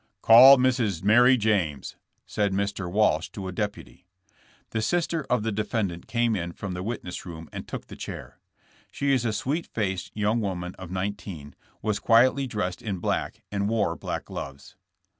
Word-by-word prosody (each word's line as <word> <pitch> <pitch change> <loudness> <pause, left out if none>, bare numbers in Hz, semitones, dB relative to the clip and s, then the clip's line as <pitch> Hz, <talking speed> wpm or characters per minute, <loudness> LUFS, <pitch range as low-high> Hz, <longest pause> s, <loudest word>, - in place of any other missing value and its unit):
*'Call 130 +5 +10
Miss 120 -9 +1
Mary 120 +5 +6
James," 95 - 0 0.3
said 100 -2 -1
Mr. 100 -2 -2
Walsh 105 +3 +2
to 95 -2 -7
a - - -4
deputy. 90 - -5 0.6
The 110 - -1
sister 165 +3 -1
of 125 -4 +1
the 110 - -1
defendant 100 -4 -2
came 115 -1 +1
in 85 -2 -4
from 95 0 -6
the 90 - -4
witness 95 -4 -5
room 80 -2 -9
and - - -7
took - - -6
the - - -11
chair. - - -8 0.5
She 140 0 0
is 125 -3 +1
a 115 - +1
sweet 140 +10 -2
faced 95 -4 -3
young 105 +2 +1
woman 90 -3 -3
of 95 -2 -8
nineteen, 90 -6 -5 0.3
was 105 -1 0
quietly 130 +4 +4
dressed 95 -6 -3
in 105 -4 -3
black 85 - -2
and 100 0 -1
wore 110 -3 +1
black - - -5
gloves. 70 +5 -8
105 Hz, 170 wpm, -26 LUFS, 90-115 Hz, 0.6 s, Call